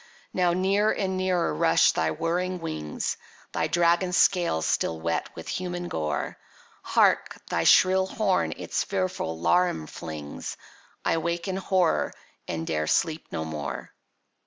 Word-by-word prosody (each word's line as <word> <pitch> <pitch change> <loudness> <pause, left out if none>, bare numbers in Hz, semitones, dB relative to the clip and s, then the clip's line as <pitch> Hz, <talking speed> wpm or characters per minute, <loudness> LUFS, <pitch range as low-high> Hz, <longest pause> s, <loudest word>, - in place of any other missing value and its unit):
Now 180 -2 +2
near 195 +4 +2
and 190 -2 -1
nearer 185 - +1
rush 75 - +4
thy 80 - 0
whirring 175 - -1
wings, 75 - -3 0.3
Thy - - 0
dragon 175 +1 +2
scales 175 - +3
still 80 - 0
wet 85 +1 -1
with - - -8
human 175 -1 -3
gore. 75 -1 -3 0.4
Hark, - - +2
thy - - +1
shrill 190 0 +5
horn 190 -1 +1
its - - -2
fearful 185 - -2
laram 85 - +2
flings! 75 -3 -7 0.5
—I - - +2
wake 170 +2 -2
in 190 0 -2
horror, 185 -3 +1 0.3
and 80 0 -3
'dare 75 -1 -1
sleep 160 - +1
no 80 - -3
more! 75 -5 -5
170 Hz, 135 wpm, -26 LUFS, -, 0.5 s, shrill